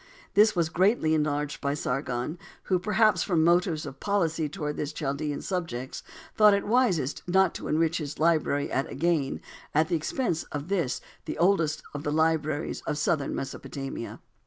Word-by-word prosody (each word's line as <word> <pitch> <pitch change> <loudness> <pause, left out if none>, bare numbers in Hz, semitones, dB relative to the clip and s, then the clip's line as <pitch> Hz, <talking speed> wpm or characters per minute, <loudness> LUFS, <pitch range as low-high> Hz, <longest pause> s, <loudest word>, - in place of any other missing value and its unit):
This 215 +1 +5
was 170 -2 +1
greatly 180 -2 +2
enlarged 150 -1 -1
by 140 0 0
Sargon, 135 +3 -2 0.2
who, 185 -2 +1
perhaps 210 -1 +3
from 165 -3 +2
motives 170 -2 +2
of 135 -1 -8
policy 165 -6 0
towards 150 0 -4
his 150 +1 -3
Chaldean 145 0 -3
subjects, 160 -9 -4 0.3
thought 210 -1 +7
it 200 - -2
wisest 205 - +1
not 190 +2 +3
to - - -6
enrich 165 +2 +1
his 150 -2 -5
library 155 -3 +1
at 135 - -1
Agane 155 -2 0 0.3
at 155 +1 +3
the - - +2
expense 165 - -1
of 145 +3 -6
this 170 -10 0 0.2
the - - -4
oldest 165 -3 +2
of 145 - -4
the 145 - -1
libraries 155 -1 0
of 150 - -1
southern 150 -1 0
Mesopotamia. 135 -2 -6
160 Hz, 160 wpm, -27 LUFS, 145-180 Hz, 0.3 s, thought